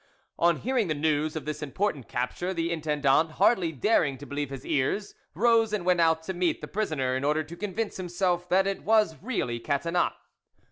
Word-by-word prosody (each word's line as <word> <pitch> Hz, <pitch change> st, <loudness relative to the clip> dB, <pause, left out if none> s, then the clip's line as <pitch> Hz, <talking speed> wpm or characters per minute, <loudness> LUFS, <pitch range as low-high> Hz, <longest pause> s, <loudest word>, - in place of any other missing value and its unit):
On 170 Hz, -1 st, +4 dB
hearing 250 Hz, -4 st, 0 dB
the 155 Hz, -, -1 dB
news 155 Hz, +1 st, 0 dB
of 155 Hz, -, -4 dB
this 150 Hz, 0 st, -4 dB
important 150 Hz, -, -2 dB
capture, 175 Hz, +9 st, -3 dB
the 165 Hz, 0 st, -1 dB
intendant, 155 Hz, -1 st, +1 dB
hardly 180 Hz, -6 st, +3 dB
daring 145 Hz, -, +1 dB
to 145 Hz, -, -10 dB
believe 145 Hz, -1 st, -3 dB
his 135 Hz, -1 st, -8 dB
ears, 200 Hz, +10 st, -1 dB, 0.2 s
rose 225 Hz, +2 st, +3 dB
and 200 Hz, -5 st, -1 dB
went 180 Hz, -1 st, +3 dB
out 160 Hz, -1 st, +3 dB
to 190 Hz, -, -4 dB
meet 175 Hz, -3 st, 0 dB
the 150 Hz, -, -7 dB
prisoner, 150 Hz, -11 st, -1 dB
in 130 Hz, -, -2 dB
order 150 Hz, +2 st, +1 dB
to 160 Hz, +3 st, -10 dB
convince 210 Hz, +3 st, -3 dB
himself 180 Hz, -1 st, -1 dB
that 190 Hz, +1 st, +4 dB
it 195 Hz, 0 st, -2 dB
was 215 Hz, -7 st, +2 dB
really 125 Hz, -, -2 dB
Catinat. 165 Hz, +8 st, 0 dB
165 Hz, 190 wpm, -27 LUFS, 145-190 Hz, 0.2 s, On